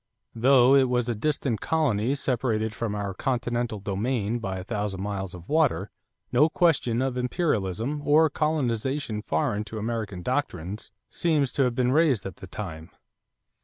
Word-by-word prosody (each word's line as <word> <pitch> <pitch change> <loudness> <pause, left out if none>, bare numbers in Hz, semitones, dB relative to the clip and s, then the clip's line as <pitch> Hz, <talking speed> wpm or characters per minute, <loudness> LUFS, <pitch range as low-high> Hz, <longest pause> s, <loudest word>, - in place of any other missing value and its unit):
Though 125 +2 +5
it 135 -2 +5
was 125 -1 +1
a - - +1
distant 125 -1 -1
colony 135 -6 +1
separated 115 -5 0
from 115 -2 -3
our 100 -1 -3
continental 120 -1 -1
domain 105 +3 -1
by 95 -4 -3
a 90 - -5
thousand 105 -2 -3
miles 95 -2 -4
of 90 -1 -12
water, 140 - +1 0.4
no 150 +6 +5
question 135 -9 +2
of 130 -1 -2
"imperialism" 125 - -1
or 155 +2 +5
"colonization 135 -6 -1
foreign 105 +5 0
to 110 +2 -7
American 110 -4 -3
doctrines" 105 - -3 0.2
seems 150 -6 +1
to 135 - +3
have 125 -1 -1
been 125 0 +2
raised 140 - +3
at 95 -3 -6
the - - -10
time. 80 0 -7
120 Hz, 155 wpm, -26 LUFS, 105-135 Hz, 0.4 s, Though